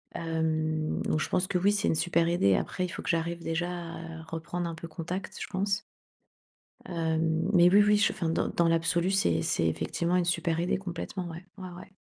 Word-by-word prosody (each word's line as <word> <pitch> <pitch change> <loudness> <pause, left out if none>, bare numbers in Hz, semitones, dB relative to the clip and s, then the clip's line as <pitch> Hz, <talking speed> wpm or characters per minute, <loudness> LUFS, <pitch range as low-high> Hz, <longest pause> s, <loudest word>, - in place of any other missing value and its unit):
Hem, 155 -1 -1
donc 155 - 0
je - - -2
pense 180 - +1
que 190 -3 0
oui, 195 +3 +3
c'est 205 -1 0
une - - +2
super 170 +1 +2
idée. 100 - +3
Après, 185 - -1
il 180 - -5
faut - - -6
que - - -5
j'arrive 170 0 -1
déjà 165 +2 -1
à 165 -2 -7
reprendre 165 +2 -4
un 165 - -5
peu 165 +1 -8
contact, 175 +4 -5
je - - -4
pense. 195 +1 -1 1.0
Hem, 160 0 0
mais 175 -1 +7
oui, 205 +2 +7
oui, 210 0 +5
je 205 - +3
enfin 170 - -2
dans 165 - +1
dans 170 - +1
l'absolu, 170 +2 +2
c'est 85 - +2
c'est 85 - +1
effectivement 170 - 0
une 180 - +2
super 170 -1 0
idée, 175 - +1
complètement, 180 0 -5
ouais. 170 +2 -8
Ouais, 185 -1 -6
ouais. - - -12
170 Hz, 210 wpm, -29 LUFS, 160-180 Hz, 1.0 s, mais